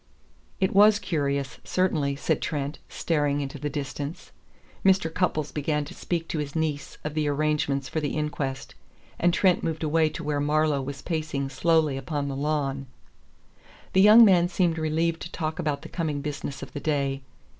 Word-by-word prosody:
"It 190 - +1
was 205 +1 +7
curious, 140 -8 -2
certainly," 155 -7 0
said 140 - -1
Trent, 145 -1 -3
staring 145 -3 0
into 140 0 -5
the 145 +2 -2
distance. 145 +2 -5 0.5
Mr. 185 -4 +3
Cupples 155 -5 0
began 150 0 -1
to - - -10
speak 170 -2 -3
to 160 - -2
his 145 0 -4
niece 155 -3 -2
of 150 - -4
the 155 -1 0
arrangements 145 -2 0
for 160 - -2
the 150 0 -2
inquest, 140 -3 -3 0.5
and 175 - +4
Trent 180 +1 +3
moved 160 0 -2
away 160 +1 +2
to 160 +2 -7
where 150 -1 -1
Marlowe 150 0 +2
was 140 +1 -6
pacing 155 -5 -2
slowly 155 0 +2
upon 140 +1 -3
the 135 - -4
lawn. 140 -2 -1 1.1
The 190 - +5
young 215 +3 +9
man 180 -4 +5
seemed 175 -2 +1
relieved 160 +1 0
to 170 - -7
talk 160 0 -3
about 150 -4 -1
the - - -7
coming 155 -4 -2
business 140 -1 -5
of - - -10
the 145 - -4
day. 140 -2 -1
150 Hz, 175 wpm, -26 LUFS, 140-165 Hz, 1.1 s, young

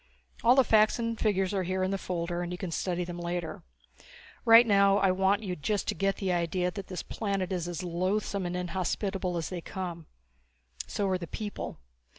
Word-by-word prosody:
All 245 +2 +6
the 265 - +6
facts 215 -2 +4
and 230 -1 -2
figures 195 -3 +1
are 195 - +1
here 185 +1 -1
in 190 - 0
the 195 - 0
folder 175 -1 -3
and 175 0 -4
you 180 - -4
can 180 -2 -5
study 180 +1 -1
them 175 0 -6
later. 175 -1 -3 0.8
Right 230 +1 +9
now 200 -2 +5
I 195 -2 +3
want 190 +3 +2
you 185 -3 -3
just 200 +6 -1
to - - +2
get 195 0 0
the 190 -2 -1
idea 180 +1 0
that 195 0 -7
this 185 -3 -5
planet 195 -4 -2
is 175 -2 -2
as 175 +1 -4
loathsome 185 +2 -1
and 175 +1 -3
inhospitable 180 +1 -2
as 165 - -3
they 180 -2 -4
come. 170 -3 -6 0.8
So 205 - -1
are 185 -1 0
the 170 - -6
people. 210 +3 -5
185 Hz, 200 wpm, -29 LUFS, 175-200 Hz, 0.8 s, Right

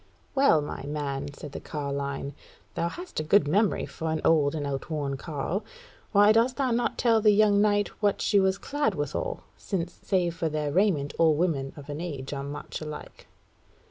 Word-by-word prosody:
"Well, 265 - +4
my 145 - -6
man," 145 -1 -3
said 145 0 -9
the - - -6
carline, 140 -1 -4 0.4
"thou 170 - -1
hast 355 - -6
a - - -1
good 175 +1 +4
memory 200 +7 +2
for 160 -1 -5
an 160 0 0
old 150 -2 +4
and 145 -2 -2
outworn 140 0 -3
carle. 160 +7 -3 0.5
Why 205 0 +6
dost 230 +3 +3
thou 265 -3 +1
not 235 +1 0
tell 230 -2 +3
the 210 - +5
young 205 -1 +5
knight 205 -1 +2
what 205 -2 +2
she 205 - +3
was 190 0 +2
clad 275 -4 -1
withal; - - -3
since 175 -3 -3
save 180 -3 +1
for 165 -1 -1
their 150 -1 -2
raiment 170 -6 +2
all 160 -2 +5
women 145 -5 0
of 140 - -10
an 150 +2 -5
age 145 -6 -5
are 140 - -3
much 145 +3 -6
alike?" 150 -1 -8
165 Hz, 185 wpm, -27 LUFS, 145-205 Hz, 0.5 s, Why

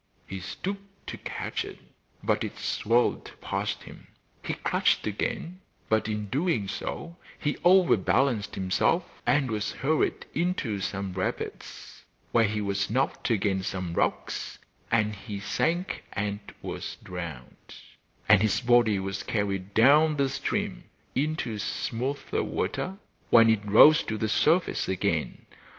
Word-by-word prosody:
He 95 - -6
stooped 195 - -6
to - - -6
catch - - -3
it, - - -9 0.5
but - - +1
it - - -5
swirled 120 +3 +1
past - - -3
him. - - -13 0.4
He - - -2
clutched - - +1
again; 165 - -3 0.3
but 110 -1 +2
in 105 -1 -2
doing 125 - 0
so 170 - -5 0.2
he 145 -1 -1
over 180 0 +6
balanced 110 +1 +1
himself 95 - 0
and 135 -4 +3
was 105 -1 -2
hurried 155 +4 0
into 160 - -1
some 100 -1 -3
rapids, 90 0 -5 0.3
where 115 -1 +4
he 105 0 -1
was 100 0 -1
knocked 130 +4 0
against 95 -4 +1
some 90 -3 -4
rocks, - - -1 0.3
and 110 -2 +2
he 100 0 -7
sank 170 - -1
and 100 0 -2 0.2
was - - -5
drowned, 85 -9 -8 0.5
and 105 -2 +7
his 110 -2 +2
body 120 -4 +4
was 95 +1 -3
carried 100 -2 -2
down 150 +6 +6
the 140 -1 +2
stream - - -2 0.3
into 135 -6 -1
smoother 130 +7 -2
water 190 +1 -2 0.3
when 115 -1 +7
it 110 -2 +1
rose 150 +10 +8
to 110 - -2
the 110 0 -1
surface 165 - +2
again. 95 - -1
110 Hz, 135 wpm, -27 LUFS, 100-145 Hz, 0.5 s, rose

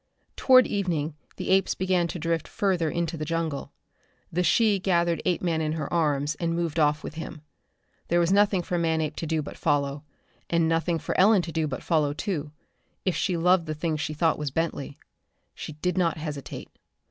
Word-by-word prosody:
Toward 255 -1 +6
evening 165 -6 -1 0.2
the - - -3
apes 195 0 +3
began 185 -2 +1
to 175 - -5
drift 165 -1 -1
further 185 -7 0
into 170 +1 -2
the 155 - -3
jungle. 160 -2 -3 0.6
The 175 - 0
she 210 +2 +3
gathered 170 -3 +1
Apeman 170 -2 0
in 155 0 -1
her 155 -1 -4
arms 150 -3 +1
and 165 -1 0
moved 170 -2 -1
off 150 0 +2
with - - -6
him. 160 -1 -7 0.7
There 175 - +2
was 170 +1 +2
nothing 200 -2 +3
for 175 0 -1
Manape 160 -2 0
to 165 - -3
do 160 -1 0
but - - -9
follow, 145 -1 0 0.5
and 170 -1 +2
nothing 165 +1 +1
for - - -4
Ellen 195 0 +5
to 170 - -5
do 160 -1 0
but 135 - -5
follow, 150 -3 +1
too 155 -4 -3 0.5
if 185 - +1
she 180 -3 0
loved 175 0 +3
the 155 - -3
thing 155 +1 -1
she 155 0 -3
thought 160 0 +1
was 150 -1 -2
Bentley. 145 -1 -3 0.6
She 155 - -7
did 180 +4 -1
not 170 -3 +1
hesitate. 150 -3 -6
165 Hz, 190 wpm, -26 LUFS, 155-175 Hz, 0.7 s, Toward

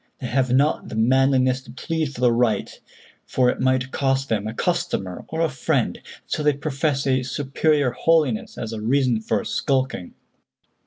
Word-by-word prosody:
They - - -7
have 130 0 0
not 140 +4 +2
the - - -6
manliness 130 +2 +3
to - - -13
plead 160 -4 -3
for 125 - -9
the 125 -1 +5
right, 115 -4 +1 0.6
for 125 -1 +2
it - - -7
might 130 0 +1
cost 135 0 0
them 110 -2 -1
a 110 - -4
customer 170 - -2
or 160 +1 -3
a 165 - +3
friend, 130 -4 -1
and - - -22 0.2
so - - -3
they 150 -1 +3
profess 140 0 -1
a 130 -1 +2
superior 145 +1 0
holiness 140 -3 +1
as 115 0 -5
a 110 - -5
reason 125 -1 +1
for - - -1
skulking." 130 -9 -1
130 Hz, 175 wpm, -23 LUFS, 125-145 Hz, 0.6 s, the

